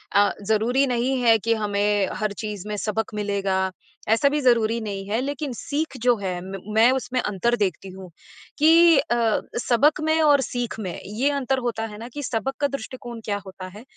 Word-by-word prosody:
अ, 205 0 +5 0.2
ज़रूरी 245 +6 +2
नहीं 250 +2 0
है 230 -2 +5
कि 230 +2 +1
हमें 205 -2 +1
हर 215 -1 -1
चीज़ 210 -2 -5
में 210 - -3
सबक 220 +1 -2
मिलेगा, 195 -2 -1 0.4
ऐसा 230 +6 +4
भी 295 - 0
ज़रूरी 230 -2 +3
नहीं 200 -2 -5
है 220 +3 0
लेकिन 280 0 -3
सीख 290 +3 -3
जो 245 - +5
है 185 -3 -3
म 190 0 -7
मैं 225 +2 +6
उसमें 255 -1 -1
अंतर 220 +4 0
देखती 195 -3 -2
हूँ 190 0 -10 0.5
कि 325 +1 +6
अ, 235 -2 +1 0.2
सबक 285 +6 +3
में 315 +1 +2
और 290 -3 +5
सीख 240 -3 -4
में 185 -5 -5
ये 230 +8 0
अंतर 270 -1 0
होता 225 -1 -2
है - - -9
ना 230 - -8
कि 290 - -5
सबक 260 +3 -2
का 285 - +2
दृष्टिकोण 245 -3 -7
क्या 205 -2 -1
होता 185 -1 -9
है 215 - -11
230 Hz, 195 wpm, -23 LUFS, 205-265 Hz, 0.5 s, मैं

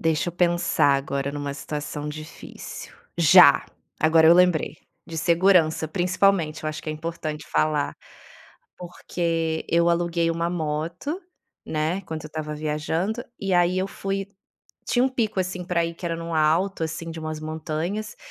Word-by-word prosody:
Deixa 160 0 +1
eu 175 - -5
pensar 175 -5 +2
agora 140 0 -2
numa 145 -1 -4
situação 150 +1 -5
difícil. 155 +1 -9 0.3
Já! 160 -4 +7 0.3
Agora 160 0 +5
eu 170 - +8
lembrei. 175 -4 +3 0.3
De 165 -2 -5
segurança, 170 -1 +3
principalmente, 175 -2 +1
eu 155 - -1
acho 155 - -6
que - - -6
é - - -1
importante 155 -1 -5
falar. 150 -2 0 0.8
Porque 165 -2 -2
eu 170 0 +3
aluguei 170 -1 +1
uma 170 +1 -1
moto, 170 - -3 0.5
né. 155 +4 -1
Quando 160 -3 -6
eu - - -7
estava 155 -1 -5
viajando. 160 +9 -2 0.2
E 195 -1 -1
aí 175 +1 +3
eu 190 - 0
fui 195 0 -3 0.6
tinha 245 0 +2
um 265 - +3
pico, 230 -6 -2
assim, 185 0 -3
pra 170 -1 +1
ir 165 0 -4
que 180 - -11
era 165 -1 -1
no 165 0 -5
alto, 165 +4 +2
assim, 165 +1 -5
de 160 - -7
umas 155 0 -4
montanhas. 160 +7 -4
165 Hz, 155 wpm, -24 LUFS, 155-180 Hz, 0.8 s, eu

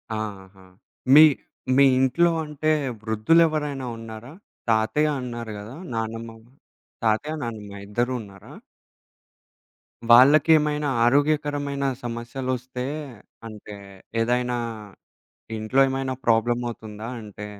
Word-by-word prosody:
ఆహా! 95 -3 -7 0.5
మీ 155 +2 +10 0.5
మీ 140 - +7
ఇంట్లో 170 +7 +3
అంటే 150 0 -3 0.3
వృద్ధులెవరైనా 145 +5 +2
ఉన్నారా? 115 +2 -9 0.4
తాతయ్య 110 +8 +2
అన్నారు 120 -2 -6
గదా 110 +5 -9 0.2
నానమ్మ? 115 0 -4 0.7
తాతయ్య, 115 +8 +1
నానమ్మ 105 -4 -6
ఇద్దరు 120 +5 -1
ఉన్నారా? 100 -2 -14 1.6
వాళ్ళకేమైనా 150 +3 +5 0.2
ఆరోగ్యకరమైన 145 +1 +1 0.2
సమస్యలొస్తే 125 +2 -4 0.6
అంటే 105 -1 -10 0.5
ఏదైనా 125 +1 0 1.0
ఇంట్లో 110 +5 0
ఏమైనా 135 0 -2
ప్రాబ్లమవుతుందా? 115 -2 -1
అంటే 105 0 -9
120 Hz, 80 wpm, -24 LUFS, 110-140 Hz, 1.6 s, మీ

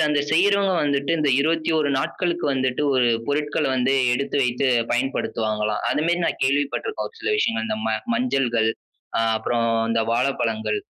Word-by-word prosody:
அதில - - +3
அந்த 150 -1 +2
செய்யிறவங்க 200 +2 +3
வந்துட்டு, 140 -1 0
இந்த 150 -2 +1
21 160 0 +1
நாட்களுக்கு 175 +4 -2
வந்துட்டு, 130 +1 -1
ஒரு 125 -2 +3 0.2
பொருட்கள 150 +1 -1
வந்து 130 +2 +2 0.2
எடுத்து 140 +2 -2
வைத்து 125 +2 0 0.2
பயன்படுத்துவாங்களாம். 110 -4 -1
அது 150 - 0
மேரி 175 +1 +1
நான் - - -2
கேள்வி 140 +2 +2
பட்டுருக்கோ, 445 - -3
ஒரு 460 - -23
சில 440 - -1
விஷயங்கள். 230 - 0
இந்த 220 0 -2
ம - - +1 0.2
மஞ்சள்கள். 135 - +1 0.5
அ - - +3 0.2
அப்புறம் 115 +1 0 0.2
இந்த 115 0 +1
வாழப்பழங்கள். 115 -4 0
140 Hz, 160 wpm, -22 LUFS, 120-165 Hz, 0.5 s, அதில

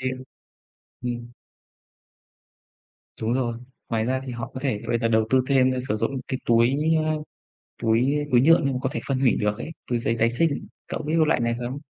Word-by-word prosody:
thì 130 0 -1 0.9
ừm. 120 -1 -3 2.0
Đúng 110 +1 0
rồi. 125 -2 0 0.4
Ngoài 110 -1 0
ra 130 +2 0
thì 130 - -5
họ 120 -1 -6
có 130 - -5
thể 130 -7 -1
bây 120 - +1
giờ 115 - +1
đầu 110 -1 +3
tư 130 0 +4
thêm, 130 -2 +4
a, - - -2
sử 105 - 0
dụng 115 +4 -1 0.2
cái 130 - -2
túi, 120 +3 +4 0.3
a, 155 - +1 0.7
túi 130 +6 +2
túi 120 - +6
nhựa 165 +6 +6
nhưng 140 - +1
mà 125 - -1
có - - +1
thể - - -2
phân 135 -2 0
hủy 130 -3 +3
được 105 0 0
ấy, - - -5 0.2
túi 120 -1 0
giấy 115 0 0
tái 115 +1 +3
sinh, 145 +5 0 0.2
cậu - - -4
biết 155 +1 -3
cái 160 -1 +4
loại 150 - +2
này 115 0 +1
không? 125 +3 -4
125 Hz, 210 wpm, -24 LUFS, 115-135 Hz, 2.0 s, túi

